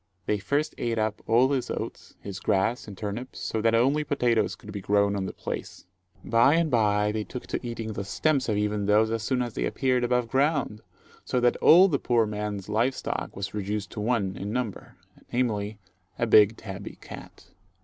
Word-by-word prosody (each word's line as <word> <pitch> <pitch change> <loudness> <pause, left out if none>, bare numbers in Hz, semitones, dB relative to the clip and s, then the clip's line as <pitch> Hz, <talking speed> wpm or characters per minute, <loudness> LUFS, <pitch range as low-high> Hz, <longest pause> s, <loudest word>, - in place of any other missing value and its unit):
They 105 - 0
first 140 +9 -1
ate 115 -1 -1
up 110 -1 -1
all 120 +4 +4
his 135 -3 -1
oats, - - -6
his 100 -2 -7
grass, 105 +6 0
and 100 -2 -9
turnips, 110 +5 -5
so 110 - -2
that 115 +1 +3
only 135 +6 +3
potatoes 120 -6 +1
could 105 -3 -12
be 100 -1 -5
grown 100 +1 +2
on 95 -1 -2
the - - -4
place. - - -6 0.4
By 120 +6 +4
and 165 -2 +1
by 105 -3 +2
they 110 0 -2
took 125 +3 -8
to - - -4
eating 115 -2 -4
the 100 - -4
stems 135 +7 0
of 105 - +1
even 105 -1 -1
those 110 +2 +4
as 115 -1 -1
soon 125 +2 0
as 120 -2 -5
they - - -1
appeared 130 -2 0
above 125 -1 +1
ground, 135 -4 0 0.4
so 125 - 0
that 120 0 +3
all 180 +5 +7
the 145 -7 0
poor 120 -2 +2
man's 105 -2 -4
live 115 +5 +1
stock - - -4
was 100 +1 -5
reduced 105 0 -3
to 110 - -6
one 105 -4 0
in 100 +2 -4
number, 120 -4 -4 0.4
namely, 110 -4 -1 0.4
a 115 - +1
big 110 -1 +5
tabby 100 -1 -8
cat. - - -12
110 Hz, 200 wpm, -26 LUFS, 105-125 Hz, 0.4 s, all